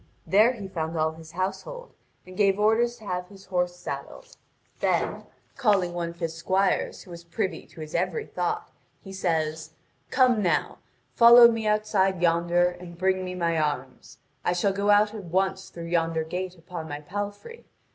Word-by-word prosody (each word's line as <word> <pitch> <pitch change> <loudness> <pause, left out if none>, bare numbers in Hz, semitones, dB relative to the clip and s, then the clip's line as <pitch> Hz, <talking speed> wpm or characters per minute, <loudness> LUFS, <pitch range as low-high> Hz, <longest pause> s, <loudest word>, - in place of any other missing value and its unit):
There 215 +6 +5
he 205 -5 -7
found 165 -3 -4
all 155 0 +1
his 160 0 -13
household, 340 - -4 0.3
and 185 0 -12
gave 195 0 +2
orders 225 +3 +3
to 220 - -15
have 180 -2 -3
his 195 0 -15
horse 180 -1 -1
saddled; - - -8 0.4
then, - - 0 0.3
calling 200 -8 +2
one 170 -1 -2
of 170 0 -12
his 165 -2 -2
squires 190 +4 0
who 180 - -14
was 170 0 -9
privy 170 0 -3
to 160 - -12
his 155 0 -8
every 180 0 -1
thought, 180 -1 -3 0.3
he 195 - -9
says: 160 -3 -2 0.4
"Come 250 -4 +3
now, 180 -4 0 0.3
follow 235 0 +9
me 225 -1 -2
outside 210 -3 +1
yonder, 175 +1 +3
and 175 -1 -8
bring 185 +1 +1
me 180 0 -5
my 170 -2 0
arms. 135 -4 -3 0.3
I 175 - +1
shall 195 +2 +1
go 200 +1 -1
out 210 +1 +5
at 210 -4 -7
once 190 +2 -1
through 170 - -9
yonder 165 -1 0
gate 180 +3 -5
upon 165 -1 -8
my 145 0 -5
palfrey. 205 - -6
180 Hz, 175 wpm, -26 LUFS, 170-205 Hz, 0.4 s, follow